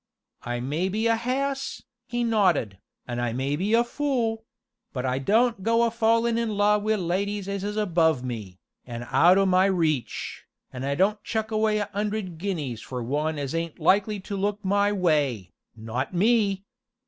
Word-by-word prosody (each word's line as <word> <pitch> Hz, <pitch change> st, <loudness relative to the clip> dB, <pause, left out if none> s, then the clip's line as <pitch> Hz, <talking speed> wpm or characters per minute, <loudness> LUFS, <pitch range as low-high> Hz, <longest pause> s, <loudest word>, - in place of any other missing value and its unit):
"I 120 Hz, 0 st, -3 dB
may 155 Hz, +9 st, -1 dB
be 215 Hz, +4 st, -1 dB
a 230 Hz, 0 st, +4 dB
hass," 270 Hz, +4 st, -2 dB, 0.2 s
he 240 Hz, -1 st, -1 dB
nodded, 185 Hz, -, +1 dB, 0.3 s
"an' 120 Hz, -1 st, -3 dB
I 120 Hz, -1 st, -1 dB
may 135 Hz, +3 st, -1 dB
be 200 Hz, +8 st, +1 dB
a 235 Hz, -, +4 dB
fool 240 Hz, -4 st, -1 dB, 0.5 s
but 130 Hz, -2 st, -3 dB
I 130 Hz, +1 st, 0 dB
don't 225 Hz, -, +2 dB
go 230 Hz, +3 st, +3 dB
a 230 Hz, -, +2 dB
fallin' 230 Hz, 0 st, +2 dB
in 220 Hz, -3 st, -2 dB
love 205 Hz, 0 st, +3 dB
wi' 215 Hz, +1 st, +1 dB
ladies 200 Hz, +2 st, -2 dB
as 200 Hz, -1 st, -3 dB
is 210 Hz, +1 st, -3 dB
above 165 Hz, -9 st, +2 dB
me, 110 Hz, -7 st, -6 dB, 0.3 s
an' 120 Hz, 0 st, -6 dB
out 170 Hz, +8 st, +6 dB
o' 195 Hz, -, +4 dB
my 185 Hz, 0 st, +4 dB
reach, 155 Hz, -, -1 dB, 0.3 s
and 130 Hz, 0 st, -5 dB
don't 205 Hz, +4 st, +2 dB
chuck 220 Hz, 0 st, -2 dB
away 215 Hz, 0 st, +2 dB
a 205 Hz, -1 st, -2 dB
'undred 205 Hz, -4 st, -3 dB
guineas 155 Hz, -, -3 dB
for 125 Hz, -2 st, -5 dB
one 150 Hz, +5 st, -1 dB
as 140 Hz, -1 st, -3 dB
ain't 165 Hz, -1 st, -3 dB
likely 200 Hz, +5 st, +2 dB
to 200 Hz, -, -5 dB
look 205 Hz, +1 st, -2 dB
my 200 Hz, +1 st, +2 dB
way 150 Hz, -, +1 dB, 0.2 s
not 115 Hz, +8 st, -4 dB
me! 200 Hz, -1 st, +2 dB
195 Hz, 175 wpm, -25 LUFS, 145-220 Hz, 0.5 s, out